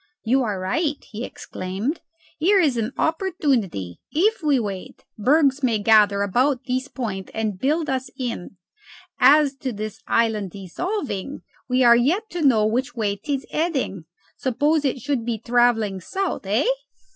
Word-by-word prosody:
"You 260 +4 +2
are 210 -6 -2
right," 290 - 0
he 225 +2 -7
exclaimed. 200 - -4 0.4
"Here 390 +6 +4
is 295 -8 +3
an 230 +1 -1
opportunity. 270 - -1
If 415 +7 +2
we 290 -4 +3
wait, 200 -4 -6
bergs 275 +4 +3
may 240 -5 +2
gather 205 -1 +4
about 250 +6 +1
this 260 +1 -1
point 210 -9 -5
and 215 -4 -2
build 305 - +1
us 265 -1 -2
in. 230 -7 -5 0.6
As 280 +2 +6
to 260 0 -3
this 215 0 -6
island 220 -4 +1
dissolving, 260 - -4 0.3
we 255 +1 +3
are 235 -1 +8
yet 335 - +1
to 350 - -3
know 240 -8 +4
which 250 +6 -1
way 210 -3 0
'tis 275 +5 -3
heading. 275 - -1 0.3
Suppose 290 +4 +1
it 270 -1 +1
should 275 -3 -1
be 235 -1 -2
travelling 230 -4 +2
south, 380 - -3
hey!" 210 +6 +1
250 Hz, 150 wpm, -23 LUFS, 210-290 Hz, 0.6 s, are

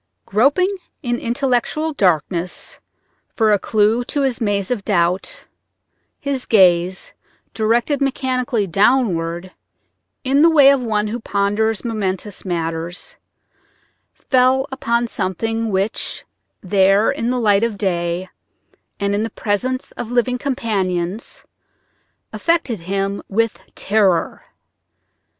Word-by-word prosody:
Groping 290 - +2 0.3
in 240 -1 -1
intellectual 270 +5 0
darkness 175 - -1 0.6
for 220 -2 +3
a 205 - +3
clew 220 +4 +2
to 285 - -1
his 260 -4 -1
maze 205 -2 0
of 225 -5 -1
doubt, 180 -2 0 0.7
his 275 -2 -3
gaze, 185 -3 +3 0.4
directed 235 +6 +1
mechanically 255 -4 0
downward 185 -4 +1 0.7
in 275 +2 +3
the 330 - +7
way 285 -4 +7
of 275 -2 +2
one 215 -3 -1
who 235 +3 -3
ponders 210 +1 0
momentous 205 -3 -3
matters, 165 -1 -4 1.0
fell 260 +1 +2
upon 235 -2 0
something 225 +3 -2
which, 195 +1 -2 0.4
there, 195 +2 +3
in 230 - -2
the 255 - 0
light 210 -2 +3
of 230 -3 -1
day 175 -2 -1 0.7
and 200 0 0
in 205 - 0
the 225 - -2
presence 250 +6 -2
of 240 -1 -6
living 245 +1 +1
companions, 200 -7 -2 0.9
affected 330 - 0
him 195 +3 -2
with 225 +2 0 0.2
terror. 200 -5 +1
215 Hz, 110 wpm, -19 LUFS, 190-250 Hz, 1.0 s, the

